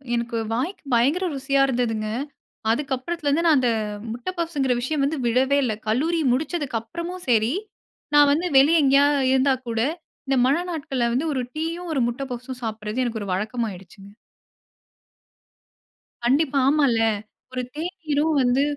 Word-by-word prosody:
எனக்கு 235 0 -2 0.2
வாய்க்கு 280 +12 -3
பயங்கர 280 +11 +3
ருசியா 275 +1 +1
இருந்ததுங்க. 230 -4 -1 0.6
அதுக்கப்புறத்துலருந்து 290 +4 -1
நான் 320 -3 +5
அந்த 250 -2 +2 0.4
முட்ட 240 +7 -5
பப்ஸ்ங்கிற 290 -6 0
விஷயம் 280 +2 -1
வந்து 305 +2 -1
விடவே 260 +4 +2
இல்ல. 235 -4 0
கல்லூரி 315 +10 +1
முடிச்சதுக்கு 285 -3 -2
அப்புறமும் 340 +9 -7
செரி, 230 +2 +3 0.6
நான் 290 -1 +7
வந்து 325 +5 0
வெளிய 305 +4 +6
எங்கேயாவது 280 0 +4
இருந்தா 265 +1 +3
கூட, 230 -1 -2 0.5
இந்த 270 0 +2
மழ 270 +2 +3 0.2
நாட்கள 275 -6 -2
வந்து 275 +7 0
ஒரு 260 -2 -1
டீயும் 335 +2 -3
ஒரு 270 - +1
முட்ட 240 +3 -6
பப்ஸும் 250 +1 -6
சாப்பிடறது 220 +2 -3
எனக்கு 225 -2 -3
ஒரு 195 - -4
வழக்கமாகிடுச்சுக. 200 -2 -5 2.2
கண்டிப்பா, 275 +2 +2
ஆமால்ல. 280 -6 +3 0.5
ஒரு 255 0 -2
தேநீரும் 320 -2 -1
வந்து 255 +2 +3
270 Hz, 135 wpm, -23 LUFS, 240-305 Hz, 2.2 s, நான்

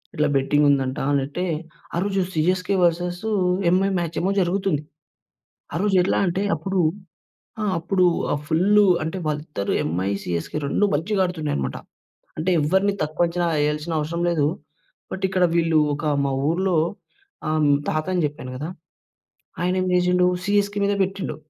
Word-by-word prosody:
ఇట్లా 150 0 +2
బెట్టింగుందంటా 140 -1 +2
అనట్టే, 140 +6 -1 0.5
ఆ - - 0
రోజు 195 -1 0
సీఎస్‌కే 185 +4 +1
వర్సెస్ 175 +2 0 0.5
ఎంఐ 190 +3 +3
మ్యాచేమో 170 +3 -1
జరుగుతుంది. 185 -4 0 0.9
ఆ - - -3
రోజు 205 -2 +1
ఎట్లా 180 - +1
అంటే 185 +2 -1
అప్పుడు, 190 +4 -2 0.8
ఆ! - - -1 0.2
అప్పుడూ 180 +2 +2 0.3
ఆహ్, 145 - -2
ఫుల్లు 200 +6 +4 0.2
అంటే 160 +4 -3
వాళ్ళిద్దరూ 150 -8 -2
ఎంఐ, 90 +5 -1
సీఎస్‌కే 85 - -3
2 205 - +2
మంచిగా 190 +6 0
ఆడుతున్నాయనమాట. 150 - -2 0.6
అంటే 165 +4 -1
ఎవ్వరిని 190 +6 +2
తక్కువ 155 +3 0
అంచనా 175 +1 -1
యేయాల్సిన 150 +2 -1
అవసరం 170 +3 -3
లేదు. 155 -4 +1 0.7
బట్ 190 - -5
ఇక్కడ 185 -1 +1
వీళ్ళు 165 -2 +3 0.2
ఒక 150 - -6 0.2
మా 135 - 0 0.2
ఊర్లో 185 +2 +1 0.7
ఆ! - - 0 0.4
తాత 155 0 -1
అని 175 -3 +1
చెప్పాను 130 -3 -9
గదా! 150 +4 -5 0.9
ఆయనేమి 185 +1 0
జేసిండు 180 0 +3 0.2
సీఎస్‌కే 205 0 +1
మీద 205 - +1
పెట్టిండు. 190 -5 -4
170 Hz, 135 wpm, -23 LUFS, 150-190 Hz, 0.9 s, ఫుల్లు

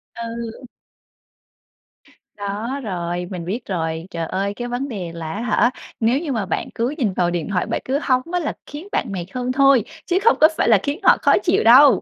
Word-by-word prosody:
Ừ. 235 +1 -6 1.7
Đó, 210 +7 -4
rồi, 175 -3 -3
mình 175 -3 -5
biết 220 +7 -4
rồi. 165 -2 -3
Trời 165 -1 -3
ơi, 195 +4 -2
cái 240 +3 -5
vấn 245 +3 -3
đề 190 -9 -5
là 165 -1 -6
á 210 - -4
hả, 240 +1 +2 0.3
nếu 235 +4 +2
như 310 -3 -4
mà 220 -5 -1
bạn - - -3
cứ 245 +6 -1
nhìn 225 - 0
vào 175 -1 +1
điện 170 -3 -2
thoại, 180 -2 0
bạn - - -2
cứ 270 +2 0
hóng 255 -4 +2
á 355 - +2
là 310 - -2
khiến 300 +7 -9
bạn 235 - -1
mệt 180 -3 -4
hơn 250 0 -2
thôi, 275 -3 +5 0.2
chứ 360 - +1
không 460 - +5
có 310 - +10
phải - - +2
là 220 - +7
khiến 285 +4 -2
họ - - +6
khó - - +4
chịu - - +2
đâu. 260 +5 +7
230 Hz, 215 wpm, -21 LUFS, 185-260 Hz, 1.7 s, có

